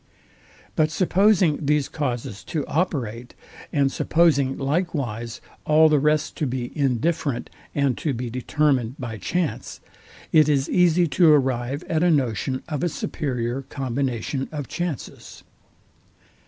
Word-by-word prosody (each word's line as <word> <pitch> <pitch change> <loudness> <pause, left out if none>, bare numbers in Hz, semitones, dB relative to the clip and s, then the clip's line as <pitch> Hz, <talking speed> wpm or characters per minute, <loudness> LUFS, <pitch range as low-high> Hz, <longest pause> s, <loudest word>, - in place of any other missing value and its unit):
But 155 -1 +3
supposing 185 -2 +3
these 150 -1 +2
causes 120 -8 -4
to 150 -4 -3
operate, 125 -8 -2 0.4
and 140 -2 +2
supposing 145 -6 +2
likewise 135 - -2 0.2
all 155 +1 +5
the 150 -1 +4
rest 150 +1 +1
to 150 - 0
be 125 -1 -4
indifferent 140 +1 -1 0.2
and 140 -3 +2
to 150 - -1
be 125 -1 -3
determined 130 0 0
by 115 -4 -6
chance, 175 - -2 0.5
it 155 -2 +5
is 140 -2 +2
easy 180 -1 +3
to 165 0 +5
arrive 130 -1 +1
at 160 -1 -1
a 175 - +4
notion 130 -3 0
of 150 -4 -3
a 175 - +2
superior 125 -4 -3
combination 135 -1 -3
of 145 -4 -5
chances. 175 -7 -6
140 Hz, 125 wpm, -23 LUFS, 125-155 Hz, 0.5 s, all